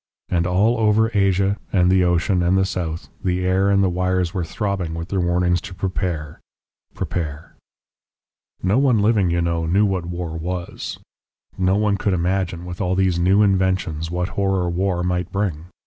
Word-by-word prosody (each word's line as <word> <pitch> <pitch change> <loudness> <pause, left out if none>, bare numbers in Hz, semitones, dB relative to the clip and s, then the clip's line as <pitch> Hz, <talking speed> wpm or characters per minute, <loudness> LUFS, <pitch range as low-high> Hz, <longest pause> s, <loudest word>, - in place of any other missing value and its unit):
And 85 -1 +1
all 105 +6 +2
over 110 +1 +3
Asia, 100 0 +2
and 90 -2 +3
the 95 -1 +4
ocean, 90 +1 +2
and 90 +2 +2
the 95 - +3
south, 85 -3 -4
the 90 0 0
air 95 +2 +2
and 100 0 +3
the - - +3
wires 90 0 0
were 95 -3 -1
throbbing 95 -2 -3
with 85 +2 -6
their 95 - -1
warnings 90 0 +1
to 95 0 -9
prepare 90 -5 -3 0.6
prepare. 75 -3 -4 1.1
"No 100 +7 +3
one 135 -4 +3
living, 105 -3 +3
you 85 0 +1
know, 85 -1 -1
knew 100 +5 +3
what 95 -4 -1
war 85 -2 -4
was; 85 +2 -5 0.6
no 95 +1 +2
one 105 -1 +1
could 100 -1 0
imagine, 90 0 -1
with 90 +1 -6
all 90 -1 0
these 95 -2 +1
new 95 +4 +4
inventions, 95 -5 0
what 90 +2 -2
horror 95 -2 0
war 90 0 0
might 90 0 -1
bring. 90 -6 -2
90 Hz, 175 wpm, -21 LUFS, 85-100 Hz, 1.1 s, the